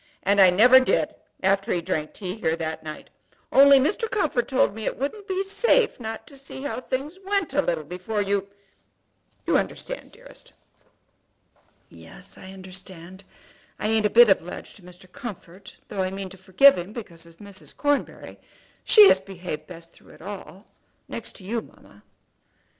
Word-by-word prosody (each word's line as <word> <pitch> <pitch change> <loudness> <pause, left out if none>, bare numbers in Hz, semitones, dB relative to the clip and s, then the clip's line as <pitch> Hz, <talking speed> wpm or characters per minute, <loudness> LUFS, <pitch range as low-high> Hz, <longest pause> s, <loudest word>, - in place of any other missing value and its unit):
And 200 0 +4
I 190 - +8
never 245 +8 +7
did 255 - +1 0.3
after 195 +3 +1
he 175 - +1
drank 155 -2 -3
tea 185 -3 -5
here 160 -6 0
that 160 -1 -4
night; 155 -1 -9 0.4
only 275 0 +8
Mr. 415 - 0
Comfort 310 - 0
told 265 -5 +2
me 220 0 -7
it - - -2
wouldn't 395 - -4
be 380 0 -1
safe 440 - +2
not 225 -1 -6
to 280 - -15
see 270 0 -10
how 285 -3 -4
things 275 +8 -4
went 390 -6 -1
a 290 - +3
little 170 - -2
before 180 +7 -4
you, 200 -1 0 1.0
you - - +3
understand, - - -6
dearest?" - - -16 1.3
"Yes, - - -11
I 190 - -11
understand. 190 -1 -10 0.5
I - - -2
ain't 220 -1 +3
a - - -6
bit 240 +3 +7
obliged 180 -3 -1
to - - -17
Mr. 180 +1 -15
Comfort, 195 -5 -10
though 195 - -3
I 185 - 0
mean 195 0 -6
to 190 - -11
forgive 190 +6 +5
him 180 +4 -7
because 170 -8 -8
of 165 0 -18
Mrs. 195 -7 -10
Cornbury. 290 -1 -2 0.4
She 425 -2 +8
has 190 - +5
behaved 180 -5 -7
best 170 -1 -12
through - - -19
it - - -17
all, 195 0 -9 0.4
next - - -7
to 195 - -11
you, 225 +4 -2
mamma." 100 - -19
200 Hz, 170 wpm, -24 LUFS, 180-270 Hz, 1.3 s, I